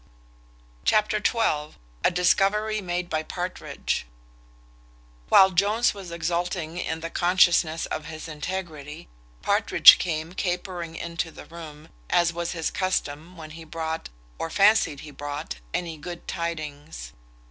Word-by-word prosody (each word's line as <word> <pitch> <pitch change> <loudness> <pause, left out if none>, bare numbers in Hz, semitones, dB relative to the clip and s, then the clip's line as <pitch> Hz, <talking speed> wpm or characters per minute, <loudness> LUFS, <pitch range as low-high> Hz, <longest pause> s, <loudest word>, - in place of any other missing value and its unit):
Chapter 215 0 +2
xii. 155 -11 +1 0.3
A - - +5
discovery 205 +4 +2
made 175 -1 -2
by 155 -2 -1
Partridge. 175 - -4 1.2
While 190 0 +7
Jones 205 +6 +2
was 195 -3 -9
exulting 170 0 -2
in 160 -2 -3
the 165 0 -5
consciousness 175 -2 +3
of 155 - -4
his 155 0 -7
integrity, 155 -1 -6 0.3
Partridge - - +7
came 165 -1 -2
capering 180 -2 -3
into 170 0 -3
the - - -12
room, 155 -2 -11 0.2
as 170 -1 +3
was 170 0 -3
his 165 -2 -2
custom 175 -2 -2
when 155 -1 -9
he 165 +1 -9
brought, 160 0 -4 0.3
or 165 - -2
fancied 200 -6 +4
he 155 - -10
brought, 145 - -5
any 165 -3 -3
good 175 +3 -8
tidings. 155 - -5
170 Hz, 125 wpm, -25 LUFS, 155-180 Hz, 1.2 s, While